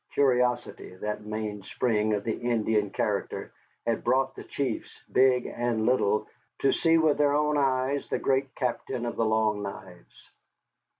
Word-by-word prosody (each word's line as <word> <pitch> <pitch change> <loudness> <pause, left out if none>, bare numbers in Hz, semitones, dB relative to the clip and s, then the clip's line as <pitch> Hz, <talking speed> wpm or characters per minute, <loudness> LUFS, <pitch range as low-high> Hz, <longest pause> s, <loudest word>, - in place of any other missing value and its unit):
Curiosity, 125 -7 +1
that 105 +2 -4
mainspring 105 +1 -1
of 100 - -3
the 110 - -1
Indian 110 -3 0
character, - - -2 0.3
had 115 -1 0
brought 130 +2 +1
the - - -8
chiefs, 130 -5 -4
big 130 -1 +4
and 120 -2 -1
little, 105 -4 +2 0.3
to 135 - +4
see 165 -1 +3
with 160 -2 +3
their 145 -1 +4
own 150 0 +2
eyes 135 0 +1
the - - 0
great 135 0 0
Captain 125 -1 -2
of 120 - -3
the 115 - +1
Long 110 -1 +1
Knives. 95 -3 -10
120 Hz, 145 wpm, -27 LUFS, 110-135 Hz, 0.3 s, big